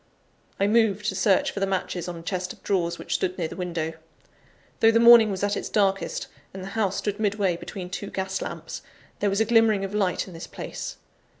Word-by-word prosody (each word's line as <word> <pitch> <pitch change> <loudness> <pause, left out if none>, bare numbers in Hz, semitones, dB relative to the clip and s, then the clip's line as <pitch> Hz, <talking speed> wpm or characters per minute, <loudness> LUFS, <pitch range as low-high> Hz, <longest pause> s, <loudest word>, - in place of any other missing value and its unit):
I 200 - +3
moved 210 -1 +2
to - - -4
search 195 -4 +3
for - - -5
the 195 - +1
matches 185 -2 -2
on 175 - -4
a 165 - -9
chest 180 +1 -3
of - - -21
drawers, 170 -3 0
which - - -5
stood 185 0 -1
near 170 -3 -1
the - - -9
window. 170 -3 -3 0.9
Though 225 - +6
the 230 0 +4
morning 235 -2 +8
was 195 -1 -3
at 205 0 +1
its - - -4
darkest, 195 -2 0 0.3
and 190 - -6
the 190 - -6
house 200 -2 0
stood 205 0 -2
midway 205 -4 +1
between 180 +1 -7
two 200 +2 -5
gas 190 0 -3
lamps, - - -6 0.4
there 205 - +2
was 200 +2 +1
a - - +4
glimmering 220 -3 +4
of 195 - -7
light 195 -3 0
in 185 - -10
this 165 +2 -8
place. - - -6
195 Hz, 220 wpm, -25 LUFS, 185-210 Hz, 0.9 s, morning